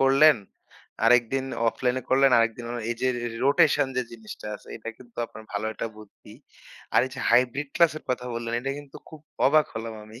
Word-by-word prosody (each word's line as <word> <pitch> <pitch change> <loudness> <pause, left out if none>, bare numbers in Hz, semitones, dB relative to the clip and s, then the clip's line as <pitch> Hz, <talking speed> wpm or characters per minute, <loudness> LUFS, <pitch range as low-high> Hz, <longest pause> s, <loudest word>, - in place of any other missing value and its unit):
করলেন, 135 +2 +6 0.7
আরেকদিন 125 +3 +4 0.2
অফলাইনে 125 +1 -1
করলেন 135 +1 +5
আরেক 115 0 +3
দিন 120 - -8 0.3
এই 120 - 0
যে 130 - +2
রে 120 -1 -3 0.2
রোটেশন 145 -1 +4
যে 125 - +2
জিনিসটা 110 -2 -10
আছে - - -12
এটা 115 - -8
কিন্তু 120 -2 -18
আপনার 110 - -12
ভালো 105 +1 -2
একটা 110 - -4
বুদ্ধি। 105 -2 -15 0.6
আর - - +7
এই - - -9
যে 130 - -6
হাইব্রিড 125 +4 +3
ক্লাসের 165 -2 +3
কথা 125 0 -2
বললেন 115 0 -4
এটা 135 - -3
কিন্তু 145 -2 -11
খুব 155 - -12 0.3
অবাক 155 +2 +4
হলাম 115 0 -5
আমি। 110 +2 -13
125 Hz, 190 wpm, -26 LUFS, 115-135 Hz, 0.7 s, আর